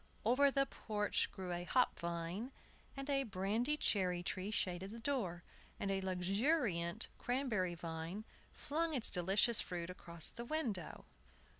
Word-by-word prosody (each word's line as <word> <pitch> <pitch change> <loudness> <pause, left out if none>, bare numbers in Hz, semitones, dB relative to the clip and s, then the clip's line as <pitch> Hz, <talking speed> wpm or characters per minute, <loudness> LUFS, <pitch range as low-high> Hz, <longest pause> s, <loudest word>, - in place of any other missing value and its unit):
Over 265 +5 +5
the 275 0 +3
porch 210 -5 -1
grew 185 -2 -5
a 175 0 -2
hop 250 +7 +2
vine, 170 +8 -3 0.5
and 275 0 -4
a 275 -1 +2
brandy 225 +5 0
cherry 180 -8 +2
tree 190 +1 -2
shaded 185 -3 -1
the 225 - -7
door, 220 -10 -1 0.4
and 195 - -1
a 195 0 0
luxuriant 190 - +1
cranberry 235 -9 0
vine 165 +5 -5 0.3
flung 320 +2 -1
its 245 - +4
delicious 200 +5 +4
fruit 175 -1 -4
across 170 -2 0
the 235 - -6
window. 235 - -3
200 Hz, 140 wpm, -38 LUFS, 175-250 Hz, 0.5 s, Over